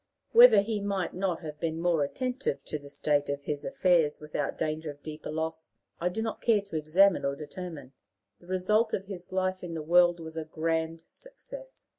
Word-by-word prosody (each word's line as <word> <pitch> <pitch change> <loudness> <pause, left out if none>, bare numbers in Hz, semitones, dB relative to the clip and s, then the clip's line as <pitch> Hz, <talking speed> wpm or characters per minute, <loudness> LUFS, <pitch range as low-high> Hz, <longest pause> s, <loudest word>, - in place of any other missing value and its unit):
Whether 475 - +9
he 210 0 -2
might 200 -2 -2
not 185 -2 -1
have 155 -2 -7
been 160 0 -2
more 170 -3 +2
attentive 255 - -2
to 150 - -4
the 140 0 -12
state 145 0 0
of 140 0 -3
his 145 0 -3
affairs 180 - +2
without 150 0 -3
danger 155 0 -2
of 145 0 -10
deeper 155 0 -7
loss, 160 +1 -4 0.3
I 175 - +1
do 220 +5 -3
not 225 - -4
care 225 -3 +4
to 200 -4 -9
examine 170 +6 +4
or 140 0 0
determine; 150 -2 -8 0.5
the 175 - -19
result 210 +5 +1
of 195 - -5
his 180 -3 -7
life 185 0 -1
in 170 -2 -5
the 155 - -4
world 175 +2 +5
was 160 0 -8
a 160 - -2
grand 160 +1 -2
success. - - -11
170 Hz, 195 wpm, -29 LUFS, 155-195 Hz, 0.5 s, Whether